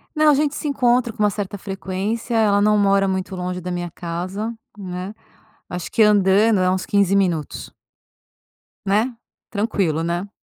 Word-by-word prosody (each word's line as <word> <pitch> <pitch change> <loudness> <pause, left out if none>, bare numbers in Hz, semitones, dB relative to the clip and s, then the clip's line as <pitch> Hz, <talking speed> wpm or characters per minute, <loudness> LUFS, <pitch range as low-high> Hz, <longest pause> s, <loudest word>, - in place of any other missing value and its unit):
Não, 305 0 +5
a - - +5
gente 295 +1 +1
se 305 - -5
encontra 245 -3 +2
com 215 - -3
uma 210 - +4
certa 205 -1 -4
frequência, 195 +4 -4
ela 205 -2 +3
não 210 +1 +4
mora 195 -1 +3
muito 190 0 -2
longe 180 0 -3
da 180 +1 -5
minha 175 -1 -3
casa, 180 +6 -4 0.2
né. 185 +1 -6 0.6
Acho 180 -1 -5
que 225 - +4
andando 205 0 +4
é 185 0 +3
uns 185 0 -1
15 200 -1 +2
minutos. 170 -7 -1 1.2
Né? 215 +6 +1 0.4
Tranquilo, 195 -7 0
né. 175 +4 -2
200 Hz, 160 wpm, -21 LUFS, 185-215 Hz, 1.2 s, Não